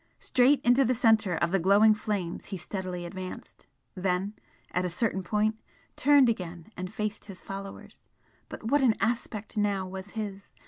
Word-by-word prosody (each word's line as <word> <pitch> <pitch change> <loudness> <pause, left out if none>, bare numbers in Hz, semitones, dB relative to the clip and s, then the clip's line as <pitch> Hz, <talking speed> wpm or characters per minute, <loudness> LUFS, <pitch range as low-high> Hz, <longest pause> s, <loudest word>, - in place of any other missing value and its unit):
Straight 265 +3 +3
into 245 +3 +4
the 255 0 +1
centre 220 -6 +3
of 170 +1 0
the 195 - +2
glowing 200 +5 +6
flames 205 -5 -3
he 195 - -5
steadily 180 0 -5
advanced 185 +1 -8 0.3
then, 185 +1 -1 0.4
at 180 - 0
a 180 - -1
certain 195 +2 -1
point, 215 +3 0 0.3
turned 285 -1 +5
again 180 -4 -3
and 185 +1 -5
faced 215 -1 -4
his 195 -3 -9
followers. 195 0 -9 0.5
But - - -8
what 275 +6 +2
an 240 -5 +4
aspect 225 -2 -2
now 200 -2 0
was 190 +1 -7
his! 200 -2 -6
200 Hz, 165 wpm, -28 LUFS, 185-220 Hz, 0.5 s, glowing